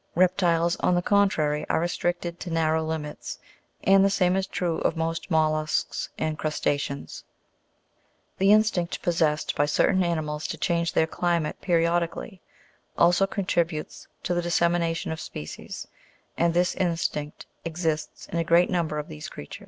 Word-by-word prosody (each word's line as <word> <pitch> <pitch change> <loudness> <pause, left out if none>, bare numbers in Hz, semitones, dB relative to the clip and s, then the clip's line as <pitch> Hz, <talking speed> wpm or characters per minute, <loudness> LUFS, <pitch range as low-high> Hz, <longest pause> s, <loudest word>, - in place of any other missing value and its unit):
Reptiles, 175 -1 +3
on 180 - +2
the 175 - +1
contrary, 165 -8 +2
are - - +2
restricted 175 0 -2
to 180 - -6
narrow 160 -1 +1
limits, 155 -2 -5 0.5
and 195 0 +6
the 195 - +4
same 185 -2 +2
is 190 0 0
true 175 -4 -1
of 165 - 0
most 165 +2 -2
mollusks 155 -2 0
and 155 -1 -2
crusta'ceans. 145 -2 -2 1.2
The 195 +1 +5
instinct 210 -5 +2
possessed 160 -3 +1
by 145 - +2
certain 185 +5 +3
animals 155 -3 -2
to - - -5
change 170 -1 0
their 160 - +3
climate 170 -1 -1
periodically, 170 - 0 0.6
also 175 +3 +4
contributes 170 -5 -2 0.2
to 180 - 0
the 175 - +1
dissemination 170 -1 +1
of 160 - -4
species; 75 - -7 0.5
and 170 0 +1
this 180 0 +2
instinct 165 -4 -2 0.2
exists 160 -2 -3
in 170 - +1
a - - +2
great 170 +2 +4
number 160 -4 0
of 150 - -4
these 75 - -8
creatures. 75 - -9
170 Hz, 145 wpm, -26 LUFS, 155-175 Hz, 1.2 s, and